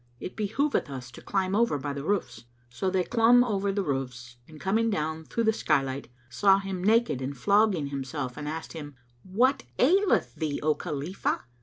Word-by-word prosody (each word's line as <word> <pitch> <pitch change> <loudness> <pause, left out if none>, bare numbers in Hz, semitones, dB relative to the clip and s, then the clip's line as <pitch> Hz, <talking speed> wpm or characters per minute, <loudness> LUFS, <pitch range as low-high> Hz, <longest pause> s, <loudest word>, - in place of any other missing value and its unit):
It - - -7
behoveth 220 - 0
us 125 -3 -7
to - - -12
climb 190 -1 -1
over 230 -9 +2
by 140 +1 -4
the 140 0 -5
roofs." 125 - -2 0.3
So 185 +10 -1
they 185 -1 +1
clomb 240 +3 +5
over 200 -4 0
the 200 0 -1
roofs 125 -5 -4
and 155 -1 -13
coming 220 +6 +1
down 160 -4 -2
through 230 - -1
the 220 0 +3
sky 150 -9 +2
light, 135 +1 -5 0.2
[FN#210] - - -20
saw 195 -1 +5
him 195 -2 -4
naked 220 - +3
and 135 +1 -4
flogging 200 - +2
himself 135 -1 -4
and 150 0 -6
asked 160 +1 -6
him, 145 -3 -8 0.3
"What 245 - +2 0.2
aileth 375 +9 +3
thee, 155 -3 -3
O 155 0 +3
Khalifah?" 155 +3 -3
175 Hz, 190 wpm, -27 LUFS, 140-210 Hz, 0.3 s, clomb